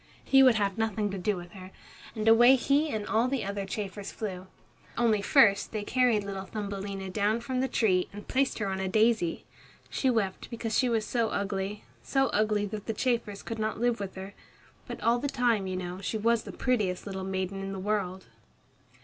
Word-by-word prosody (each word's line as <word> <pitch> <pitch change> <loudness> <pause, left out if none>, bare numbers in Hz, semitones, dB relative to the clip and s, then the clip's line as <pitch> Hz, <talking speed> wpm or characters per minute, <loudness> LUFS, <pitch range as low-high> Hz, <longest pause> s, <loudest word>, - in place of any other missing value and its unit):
He 270 0 +5
would 255 -3 +6
have 200 -1 0
nothing 215 -2 0
to 195 - -4
do 205 +3 0
with 175 -1 -9
her, 185 0 -10 0.5
and 215 0 -2
away 240 +3 +8
he 280 +4 +2
and 215 -5 -3
all 225 +4 +2
the 265 -4 -1
other 200 0 -3
chafers 200 0 -5
flew. 190 -4 -6 0.5
Only 225 -3 +3
first 205 -4 +4
they 215 -2 -3
carried 245 -2 +2
little 195 -1 -5
Thumbelina 200 -2 -5
down 215 +3 +1
from 255 +2 -3
the 265 - +1
tree 190 -7 +1
and 205 +1 -10
placed 270 0 +1
her 210 - -2
on 190 -1 -2
a 190 - -1
daisy. 215 -3 +2 0.5
She 265 - +1
wept 210 -6 -1
because 225 -2 -3
she 255 - +3
was 225 -2 0
so 230 -3 0
ugly 200 +1 -3 0.2
so 270 -2 +1
ugly 210 -1 +1
that 205 0 -6
the 225 - -1
chafers 230 -4 -1
could 225 -1 -5
not 215 0 -2
live 240 -1 +1
with 195 -2 -5
her. 190 +1 -8 0.5
But - - -6
all 235 +1 +3
the 285 - -2
time, 235 -7 +1
you 185 - -3
know, 180 +1 -5
she 220 - -2
was 230 +1 +1
the - - -6
prettiest 210 -8 -1
little 190 -2 -5
maiden 190 0 -3
in 195 0 -4
the 195 - -5
world. 190 -2 -2
210 Hz, 205 wpm, -29 LUFS, 195-235 Hz, 0.5 s, away